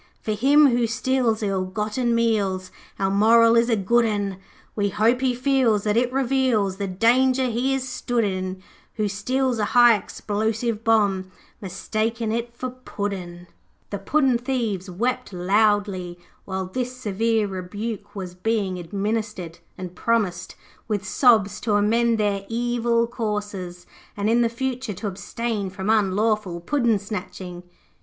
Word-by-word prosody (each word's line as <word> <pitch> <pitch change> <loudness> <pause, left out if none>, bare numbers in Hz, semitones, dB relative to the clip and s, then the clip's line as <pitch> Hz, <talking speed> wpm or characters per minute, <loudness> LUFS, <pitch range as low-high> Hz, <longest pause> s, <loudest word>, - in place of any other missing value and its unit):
'For 215 - -3
him 280 +7 +5
who 240 -1 +2
steals 245 -2 0
ill 195 -2 0
gotten 215 +5 -1
meals 200 -5 0 0.3
Our 195 0 0
moral 230 +3 +5
is 235 +1 +3
a 230 - +3
good 235 +4 +2
un. 205 -3 -1 0.4
We 205 -1 +1
hope 220 +5 +2
he 255 -2 +1
feels 250 -5 +2
that 210 -1 +1
it 245 +1 +2
reveals 255 -7 +1
The 200 -1 -2
danger 250 +7 +3
he 255 +4 0
is 260 -1 -3
stood 245 -2 -1
in 185 -1 -3 0.3
Who 215 -2 0
steals 255 +4 -1
a - - +1
high 240 -1 +8
explosive 220 +3 -2
bomb, 200 -4 +2 0.3
Mistaking 215 +4 -2
it 235 +1 -2
for 255 0 -4
Puddin'.' 195 -8 -6 0.5
The 200 - -3
puddin' 260 +3 +2
thieves 230 -7 -2
wept 240 +5 -2
loudly 195 -1 +1 0.3
while 190 -1 -3
this 250 +6 -4
severe 225 -1 0
rebuke 205 +3 -6
was 185 -3 -6
being 190 -1 -1
administered, 200 -2 -3 0.2
and 185 -1 -7
promised, 195 -3 -1 0.3
with 205 -3 -2
sobs, 210 -2 +3
to 215 -3 +1
amend 230 +3 +2
their 205 -2 0
evil 235 0 +1
courses, 205 -6 -4 0.3
and 205 +2 +1
in 240 +1 +4
the 235 - +2
future 255 -1 -3
to 215 - -7
abstain 205 +1 -3
from 190 +3 -2
unlawful 210 -3 +1
puddin' 235 +2 +1
snatching. 185 -3 -7
215 Hz, 145 wpm, -23 LUFS, 195-235 Hz, 0.5 s, high